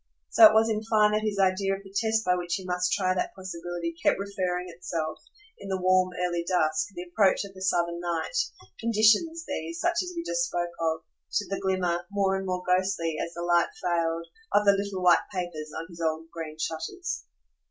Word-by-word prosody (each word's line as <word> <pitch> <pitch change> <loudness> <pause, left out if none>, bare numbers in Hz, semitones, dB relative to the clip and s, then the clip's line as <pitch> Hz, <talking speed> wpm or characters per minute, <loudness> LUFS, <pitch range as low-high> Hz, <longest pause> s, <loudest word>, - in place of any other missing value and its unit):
So 220 - +10
it - - +2
was 220 +1 +5
in 215 -1 0
fine 215 -1 +4
that 215 0 +1
his 215 -2 -2
idea 195 0 +2
of 195 - -10
the 195 -1 -14
test 220 +1 +1
by 180 - +4
which 175 -1 -1
he 190 - -6
must 180 0 0
try 185 -2 +2
that 180 - -2
possibility 175 -2 -5
kept - - +3
referring 185 -2 -2
itself, 165 -2 -4 0.4
in 195 - -8
the 190 - 0
warm 185 0 +3 0.2
early 175 -1 -1
dusk, 160 -3 +1
the 175 - -5
approach 190 +2 +2
of 195 - -11
the 190 - -12
Southern 170 -2 +1
night 175 - -3 0.4
"conditions" 230 +10 +3
these, 335 0 -4
such 345 -1 +1
as 360 -1 -5
we 335 - -3
just - - 0
spoke 175 - -2
of 160 -1 0 0.3
to 205 - 0
the 195 - -2
glimmer, 180 -2 0
more 200 -1 +1
and 190 0 -3
more 180 0 -2
ghostly 180 -3 +1
as 170 - -5
the 170 - -4
light 175 0 +3
failed, 170 -1 0 0.3
of 205 0 +3
the 200 - +8
little 200 -2 -2
white 180 -1 +4
papers 175 -5 -4
on 165 - -4
his 170 -1 -11
old 160 0 -2
green 160 -2 -6
shutters. 165 - -4
185 Hz, 205 wpm, -27 LUFS, 170-200 Hz, 0.4 s, So